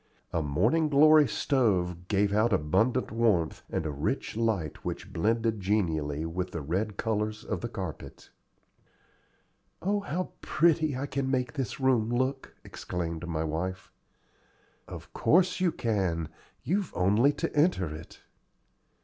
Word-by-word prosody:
A 85 - +1
Morning 150 - +2
Glory 150 +1 +6
stove 90 -10 0
gave 100 0 +1
out 110 +3 +3
abundant 110 +9 +1
warmth 110 -8 +1
and - - -2
a 75 - -1
rich 70 +7 -2
light 110 -9 -1
which - - -5
blended 115 +4 +1
genially 80 -7 0
with 90 +3 -3
the 80 - -5
red 95 +8 -2
colors 105 -1 -2
of - - -3
the 120 - -4
carpet. 95 -8 -7 1.5
"Oh, 205 +3 0
how 185 -2 -3
pretty 155 -3 +2
I 135 - -2
can 135 -1 -2
make 125 -1 0
this 135 0 -4
room 125 -4 +2
look!" 130 +3 -1
exclaimed 85 -1 -5
my 80 -2 -2
wife. 90 +4 -4 1.0
"Of - - -10
course 180 +2 +3
you 180 -2 +2
can: 95 - -1 0.3
you've 195 +2 -1
only 105 +10 +4
to - - -3
enter 145 - +2
it." 80 - -12
110 Hz, 135 wpm, -28 LUFS, 85-135 Hz, 1.5 s, Glory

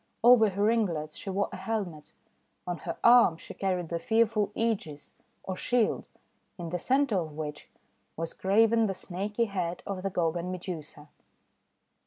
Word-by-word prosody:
Over 235 -3 +7
her 200 +1 -2
ringlets 185 -9 +1
she - - -6
wore 195 +1 0
a - - -6
helmet. 185 -9 -4 0.5
On 175 -1 -3
her - - -5
arm 235 -8 +7
she - - -10
carried 180 -4 -2
the 170 - -2
fearful 220 +1 +2
segis 195 -11 -2 0.2
— - - -43
or 190 - -4
shield 240 +3 0 0.3
— - - -44
in 170 -2 -5
the 180 - -2
centre 260 -2 +2
of 160 -3 -5
which 150 -1 -6 0.5
was 165 0 -4
graven 225 +3 +3
the 195 - -2
snaky 205 +6 -2
head 180 -4 -3
of 195 -2 -4
the 195 - -1
Gorgon 175 0 -1
Medusa. 165 -5 -7
190 Hz, 165 wpm, -29 LUFS, 170-220 Hz, 0.5 s, Over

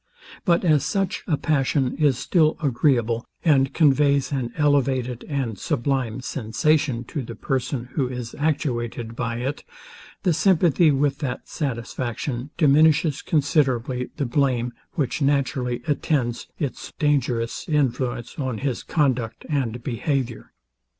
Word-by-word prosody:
But 175 -1 +3
as 150 -4 +4
such 195 +6 -1
a 155 -5 +1
passion 135 -3 +1
is 145 -5 +3
still 155 +3 +2
agreeable, 120 -5 +1 0.2
and 135 -4 +4
conveys 140 -2 +3
an 130 -4 -2
elevated 130 -5 +1
and 130 -8 -2
sublime 130 -5 -1
sensation 130 +1 0
to 145 - -5
the 115 -2 -7
person, 125 0 -2
who 135 -5 0
is 125 -2 -6
actuated 120 -7 -1
by 120 -1 -2
it, 135 +4 -3 0.6
the 180 - +3
sympathy 170 -2 +4
with 140 0 +1
that 135 -5 -4
satisfaction 125 -1 -3
diminishes 155 -1 +4
considerably 130 -5 +1
the 145 - 0
blame, 125 -2 +1 0.2
which 145 0 -1
naturally 135 -3 0
attends 140 -5 0
its 140 -5 -4
dangerous 125 -6 0
influence 130 -5 -1
on 130 -4 -2
his 130 -1 -2
conduct 130 -8 0
and 125 -5 -1
behaviour. 130 -1 -2
135 Hz, 125 wpm, -23 LUFS, 120-150 Hz, 0.6 s, as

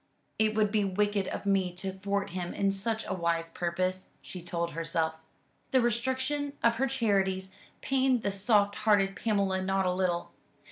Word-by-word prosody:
"It 215 0 +2
would 210 -2 +2
be 210 -1 +2
wicked 200 0 0
of - - -5
me 195 -2 +2
to 190 +1 -4
thwart 200 0 -2
him 180 -1 -4
in 195 0 +2
such 220 +3 -1
a - - -2
wise 170 -2 -1
purpose," 185 +2 -2
she 180 - -9
told 170 0 -2
herself. 165 0 -1 0.6
The 260 - +4
restriction 260 +4 0
of 230 0 +4
her 270 +3 +2
charities 195 -7 0 0.3
pained 260 -3 +2
the 200 - 0
soft 205 0 +2
hearted 205 -3 +3
Pamela 200 -4 0
not 190 0 +1
a 180 - +2
little. 180 -2 -1
195 Hz, 170 wpm, -29 LUFS, 185-220 Hz, 0.6 s, The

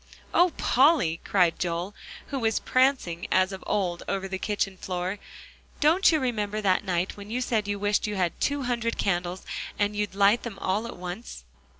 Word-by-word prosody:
"Oh, 355 0 +5
Polly!" 260 - +3
cried 180 -4 +2
Joel, 175 +2 -2 0.4
who 275 - -2
was 225 -2 +1
prancing 255 -10 +1
as 185 +1 +3
of 190 - -7
old 185 -4 0
over 195 0 -2
the 190 0 -4
kitchen 200 -2 -1
floor, 185 +2 -3 0.6
"don't 330 +6 +5
you 315 - +2
remember 215 -5 -1
that 195 -2 +2
night 180 0 -1
when 200 0 -9
you 240 +3 -1
said 225 -4 0
you 205 0 -1
wished 205 +1 +1
you 210 - -3
had 180 -3 -1
two 285 -1 0
hundred 235 -2 -1
candles, 175 -1 -1 0.3
and 205 0 0
you'd 205 -2 -2
light 200 +4 +4
them 225 -5 -7
all 205 +5 -1
at 235 - -8
once?" 180 - -7
205 Hz, 185 wpm, -27 LUFS, 185-235 Hz, 0.6 s, Oh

